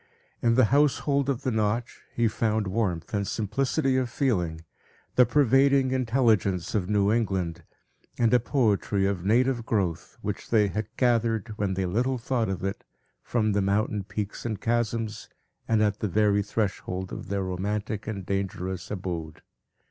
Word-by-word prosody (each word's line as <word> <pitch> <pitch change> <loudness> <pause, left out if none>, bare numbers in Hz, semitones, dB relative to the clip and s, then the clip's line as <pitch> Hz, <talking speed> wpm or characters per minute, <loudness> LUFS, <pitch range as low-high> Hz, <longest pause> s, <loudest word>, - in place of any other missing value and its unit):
In 115 -1 +3
the 130 -1 +6
household 140 -1 +2
of 135 -4 -1
the 130 - 0
Notch, 110 +2 -1
he 115 -1 +1
found 110 -1 0
warmth 95 -4 -2
and 100 -2 0
simplicity 130 - 0
of 130 -2 0
feeling, 90 - 0 0.5
the 125 -2 +5
pervading 135 0 +4
intelligence 115 -8 +1
of 95 -3 -1
New 105 -1 +3
England, 95 -7 -1 0.6
and 115 -1 +3
a 125 - +6
poetry 110 -6 +1
of 95 -3 -1
native 120 +4 +2
growth, 90 -7 -2
which 105 0 -4
they 105 -3 +3
had 105 +3 -3
gathered, 115 -3 +1
when 100 -2 0
they 95 0 -1
little 120 +8 0
thought 115 -2 -1
of 95 -2 -3
it, 95 0 -3 0.4
from 110 -3 0
the 100 0 +1
mountain 100 +1 0
peaks 100 +1 -5
and 110 -4 -3
chasms, 115 -2 -1 0.4
and 110 -1 +3
at 105 -1 0
the 105 - -1
very 105 +1 +3
threshold 100 -3 -3
of - - -7
their 100 0 -1
romantic 100 +3 -3
and 100 -4 -4
dangerous 95 -2 -3
abode. 85 -5 -5
105 Hz, 155 wpm, -27 LUFS, 95-120 Hz, 0.6 s, the